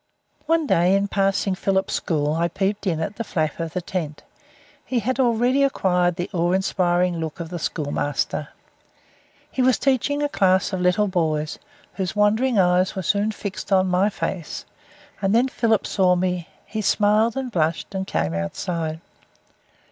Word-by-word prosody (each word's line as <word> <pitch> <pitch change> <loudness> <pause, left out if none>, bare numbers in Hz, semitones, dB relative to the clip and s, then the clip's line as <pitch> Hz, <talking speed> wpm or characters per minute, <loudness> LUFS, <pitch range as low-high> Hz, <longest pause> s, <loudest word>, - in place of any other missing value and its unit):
One 325 0 +2
day 180 -6 +3
in 200 0 +1
passing 195 0 +1
Philip's 190 0 0
school 150 -2 0
I 165 +2 +1
peeped 195 +3 -2
in 165 -4 0
at 195 +6 -4
the 230 - -2
flap 155 -7 -2
of 165 -1 -4
the 180 - -3
tent. 160 -5 -4 0.6
He 255 - -2
had 250 +4 -1
already 245 +2 +3
acquired 180 -10 +2
the 175 +1 -3
awe 175 0 +1
inspiring 180 -2 +1
look 160 0 -5
of 165 -1 -5
the 175 0 -5
schoolmaster. 145 -1 -2 1.0
He 260 - -1
was 255 -1 +4
teaching 280 +2 +1
a - - +2
class 190 -5 +2
of 185 - -1
little 180 +3 +3
boys, 155 -5 -1 0.4
whose 190 +1 -2
wandering 220 +4 +2
eyes 180 0 +3
were 190 - -3
soon 205 +3 +1
fixed 200 -1 -6
on 190 -1 +4
my 185 +3 +3
face, 185 -4 -4 0.6
and 195 +2 +2
then 245 +3 +4
Philip 225 -4 +1
saw 185 -2 +3
me. 180 -2 -1 0.2
He 215 - -4
smiled 210 +4 +2
and 260 -2 -3
blushed, 165 +1 -1
and 190 0 -3
came 80 +1 -1
outside. 160 - -3
190 Hz, 165 wpm, -23 LUFS, 170-210 Hz, 1.0 s, was